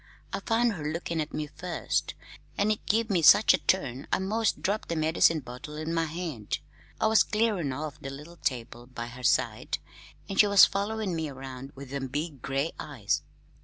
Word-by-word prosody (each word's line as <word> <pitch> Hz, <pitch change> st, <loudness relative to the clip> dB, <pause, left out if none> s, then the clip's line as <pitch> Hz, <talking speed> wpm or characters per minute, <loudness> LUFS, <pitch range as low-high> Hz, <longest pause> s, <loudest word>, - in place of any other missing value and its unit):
I -, -, -1 dB
found 230 Hz, +3 st, +2 dB
her 150 Hz, -5 st, -3 dB
lookin' 170 Hz, 0 st, -2 dB
at 150 Hz, -, -4 dB
me 155 Hz, -, -3 dB
first, 175 Hz, +4 st, -2 dB, 0.4 s
an' 205 Hz, +1 st, +2 dB
it 215 Hz, -, -2 dB
give 220 Hz, +1 st, +2 dB
me 180 Hz, -4 st, +3 dB
such 155 Hz, -, +8 dB
a -, -, +2 dB
turn 140 Hz, -8 st, 0 dB
I -, -, +4 dB
'most 215 Hz, +4 st, 0 dB
dropped 205 Hz, +3 st, -1 dB
the 170 Hz, -, -1 dB
medicine 160 Hz, 0 st, +3 dB
bottle 125 Hz, +4 st, -9 dB
in 155 Hz, +2 st, -3 dB
my 165 Hz, -1 st, +1 dB
hand. 155 Hz, -, -4 dB, 0.4 s
I -, -, +2 dB
was 220 Hz, 0 st, +6 dB
clearin' 210 Hz, -9 st, +1 dB
off 150 Hz, +2 st, -5 dB
the 135 Hz, -, -5 dB
little 150 Hz, +5 st, -10 dB
table 120 Hz, -4 st, -3 dB
by 120 Hz, -2 st, -6 dB
her 125 Hz, +2 st, -10 dB, 0.2 s
bed, -, -, -4 dB, 0.5 s
an' 195 Hz, -, -5 dB
she 210 Hz, -, +7 dB
was 200 Hz, -1 st, +9 dB
followin' 200 Hz, -1 st, -2 dB
me 160 Hz, -2 st, -2 dB
around 135 Hz, 0 st, -8 dB
with 135 Hz, -1 st, -10 dB
them 140 Hz, -1 st, -3 dB
big 145 Hz, 0 st, -4 dB
gray 135 Hz, +5 st, -1 dB
eyes. 120 Hz, -9 st, -1 dB
155 Hz, 195 wpm, -28 LUFS, 135-195 Hz, 0.5 s, was